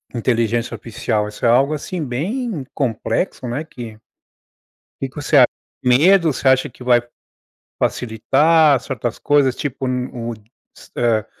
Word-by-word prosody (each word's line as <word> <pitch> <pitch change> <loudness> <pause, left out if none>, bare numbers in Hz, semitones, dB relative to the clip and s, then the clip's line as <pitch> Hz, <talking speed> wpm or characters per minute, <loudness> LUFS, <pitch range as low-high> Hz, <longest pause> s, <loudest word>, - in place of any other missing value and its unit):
inteligência 115 0 0
oficial? 110 -1 -2
Isso 105 +2 -5
é - - +5
algo, 135 +5 +4
assim, 155 +3 -4
bem 170 - -3
complexo, 130 - -2
né, 120 +6 -3
que 115 -8 -10 1.0
o - - 0
que - - -6
que - - -26
você 145 0 +1
acha, 125 - +8 0.4
medo? 160 +6 +4
Você - - -7
acha 130 +2 +3
que 125 - -13
vai 120 -1 +4 0.8
facilitar 140 +6 +3
certas 120 -2 -4
coisas, 140 -3 +2
tipo, 135 -2 -4
n 125 0 -1
o 120 -1 -4 0.4
s - - -16
hã, 115 -3 +1
125 Hz, 145 wpm, -19 LUFS, 120-145 Hz, 1.0 s, acha